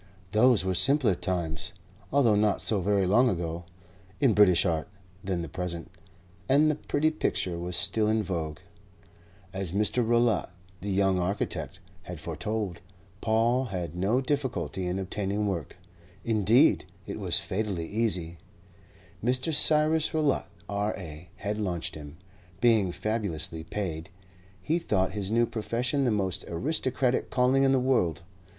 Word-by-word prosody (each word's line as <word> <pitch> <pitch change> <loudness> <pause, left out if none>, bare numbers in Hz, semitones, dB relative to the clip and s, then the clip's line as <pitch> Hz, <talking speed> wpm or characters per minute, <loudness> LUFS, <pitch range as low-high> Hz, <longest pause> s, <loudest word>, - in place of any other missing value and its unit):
Those 110 -1 +4
were 95 - 0
simpler 125 - +4
times 90 0 -3 0.4
(although 130 -6 +4
not 105 -1 +2
so 105 -4 +1
very 100 +1 +2
long 120 +7 +4
ago) 85 -2 -3 0.5
in 135 -6 +4
British 100 -4 +5
art 80 -1 -1 0.4
than 90 -3 -2
the - - -5
present, 85 +1 -5 0.6
and 150 +3 +5
the - - -2
pretty 150 +1 0
picture 90 - -1
was 90 0 -2
still 110 +4 +2
in 110 0 +1
vogue. 80 -5 -3 1.0
As 95 -3 -4
Mr. 105 +4 +1
Rowlatt, 115 -4 +2 0.3
the 100 - -4
young 95 -1 +2
architect, 95 0 -3 0.2
had 90 -2 -8
foretold, 95 +3 -4 0.4
Paul 115 +4 +2
had 90 -7 -5
no 100 +8 +1
difficulty 120 - -2
in 90 +1 -2
obtaining 100 +2 -2
work. 95 -7 -4 0.5
Indeed, 115 - +4 0.2
it - - -6
was - - +2
fatally 95 -4 -3
easy. 90 -7 0 0.8
Mr. 130 +6 0
Cyrus 155 +1 +5
Rowlatt, 150 -3 +1 0.2
R.A., 95 -5 -4
had 105 +1 -3
launched 90 -5 -2
him. 75 +1 -10 0.4
Being 110 -6 +3
fabulously 85 -7 -2
paid, 85 -2 -5 0.5
he 165 +3 +1
thought 95 - 0
his 100 -1 -4
new 115 +2 +3
profession 125 +5 -1
the - - +3
most 95 -5 -1
aristocratic 130 - -1
calling 130 +2 +3
in 135 -1 +4
the 135 - +3
world. 90 - +1
100 Hz, 140 wpm, -27 LUFS, 90-120 Hz, 1.0 s, British